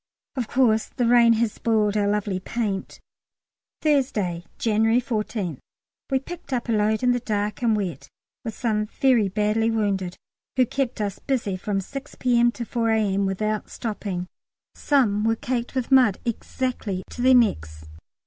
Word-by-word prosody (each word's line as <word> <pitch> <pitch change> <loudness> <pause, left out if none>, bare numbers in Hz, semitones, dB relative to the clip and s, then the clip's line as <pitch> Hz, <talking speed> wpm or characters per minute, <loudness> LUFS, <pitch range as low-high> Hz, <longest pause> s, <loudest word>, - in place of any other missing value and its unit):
Of 250 -4 -2
course 225 -4 +2
the 245 - -2
rain 235 -1 +6
has 225 -1 +1
spoilt 215 -2 +1
our 205 -1 +2
lovely 205 -2 0
paint! 200 -1 -3 0.8
Thursday, 215 - +1
January 225 +1 +2
14th. 215 - -3 0.5
We 270 - +2
picked 340 +4 -8
up 245 -2 -1
a - - 0
load 215 +2 +1
in 250 - +4
the 245 - +1
dark 210 -2 -2
and 230 -3 +3
wet, 180 -9 -4 0.3
with 225 -2 -5
some 215 -3 0
very 240 -3 +3
badly 210 +3 +1
wounded, 200 -5 -1 0.4
who 255 -1 +4
kept 255 -2 -2
us 200 -2 -3
busy 235 -8 -1
from 195 +1 -2
6 275 +8 -8
P.M. 240 -1 +3
to 235 - -5
4 230 -1 -1
A.M. 200 -3 +1
without 215 +2 -2
stopping. 200 -5 -4 0.5
Some 225 -8 +2
were 225 0 +2
caked 245 0 -3
with 255 0 -2
mud 250 -7 +5
exactly 230 -4 -3
to - - -6
their 260 +1 +6
necks! 80 - +1
220 Hz, 160 wpm, -24 LUFS, 205-245 Hz, 0.8 s, rain